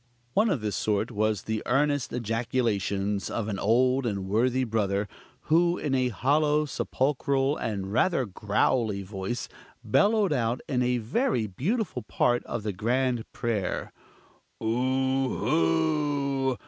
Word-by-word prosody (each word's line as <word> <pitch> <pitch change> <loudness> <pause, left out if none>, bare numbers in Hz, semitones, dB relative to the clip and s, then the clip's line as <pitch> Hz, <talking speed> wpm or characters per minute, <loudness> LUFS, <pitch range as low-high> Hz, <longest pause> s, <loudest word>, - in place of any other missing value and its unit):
One 215 +2 +3
of 145 - 0
this 105 -1 -2
sort 110 +2 0
was 110 -2 0
the 110 -1 -2
earnest 145 +1 +1
ejaculations 110 -4 -1
of 110 -2 -2
an 100 -3 -3
old 125 +4 +2
and 100 -3 -3
worthy 125 +6 +2
brother, 105 -3 0 0.3
who, 170 +2 +3
in 145 -3 -2
a 130 -1 +2
hollow, 150 +7 +2
sepulchral, 140 0 0
and 100 -3 -3
rather 150 +1 +2
growly 105 +1 0
voice, 95 +4 -4 0.4
bellowed 205 -4 +3
out 120 -2 0
in 125 -3 0
a 125 0 +2
very 120 - 0
beautiful 155 - -2
part 120 0 +1
of 110 - -4
the 105 -2 -2
grand 120 +3 0
prayer: 110 -6 -2 0.7
"Oohhoo! 130 - +1
120 Hz, 125 wpm, -27 LUFS, 105-135 Hz, 0.7 s, One